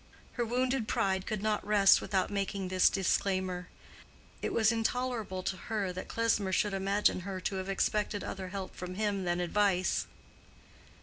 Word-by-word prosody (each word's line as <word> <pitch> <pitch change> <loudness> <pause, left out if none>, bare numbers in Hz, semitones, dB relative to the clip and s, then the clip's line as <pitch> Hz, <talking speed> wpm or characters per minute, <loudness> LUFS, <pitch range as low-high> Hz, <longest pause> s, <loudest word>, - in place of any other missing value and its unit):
Her 240 - -2
wounded 250 0 0
pride 190 -1 0
could 215 -2 -3
not 215 -1 0
rest 205 -2 +5
without 190 -1 0
making 195 -1 -2
this 185 0 +5
disclaimer. 185 -1 0 0.7
It - - -2
was 220 -1 +3
intolerable 225 -4 -1
to 190 - -1
her 200 -2 -3
that 185 - -6
Klesmer 225 -4 +1
should 205 +2 +1
imagine 195 +1 +2
her 190 +1 -5
to 190 +1 -2
have 190 +1 -4
expected 205 +1 0
other 190 -1 -5
help 190 0 -6
from 180 0 -6
him 205 -2 -1
than 175 0 0
advice. 185 +1 +1
195 Hz, 160 wpm, -31 LUFS, 185-215 Hz, 0.7 s, rest